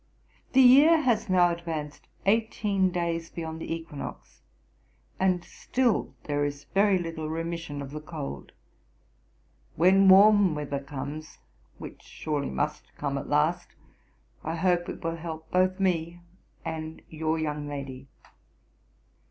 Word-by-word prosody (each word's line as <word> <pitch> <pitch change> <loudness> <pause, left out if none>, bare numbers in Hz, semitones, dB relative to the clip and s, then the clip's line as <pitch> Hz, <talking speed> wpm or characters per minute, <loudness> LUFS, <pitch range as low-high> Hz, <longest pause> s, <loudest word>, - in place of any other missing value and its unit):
The 265 - +7
year 290 +6 +7
has 235 -6 +1
now 180 -1 +4
advanced 160 -3 -5 0.2
eighteen 205 -2 +2
days 170 -2 -2
beyond 160 -1 -6
the - - -5
equinox, 165 -3 -7 0.8
and 185 -2 +2
still 250 -4 -1
there 145 -1 -1
is 145 0 -3
very 200 0 +4
little 165 -3 -4
remission 165 -3 -4
of 135 - -9
the 150 +1 -6
cold. 150 - -7 1.2
When 190 +3 +5
warm 200 -2 +7
weather 145 -1 -3
comes, 145 +3 -7 0.4
which - - -10
surely 150 -2 -3
must 65 - -3
come 140 -1 -2
at 140 - -4
last, 150 +4 +1 0.7
I 160 +1 -3
hope 175 0 +1
it - - -7
will 165 0 -2
help 160 -1 -7
both 185 +1 +2
me 175 -2 0 0.4
and 160 -1 -5
your 160 0 -2
young 150 -2 -3
lady. 135 -2 -7
165 Hz, 125 wpm, -27 LUFS, 150-185 Hz, 1.2 s, The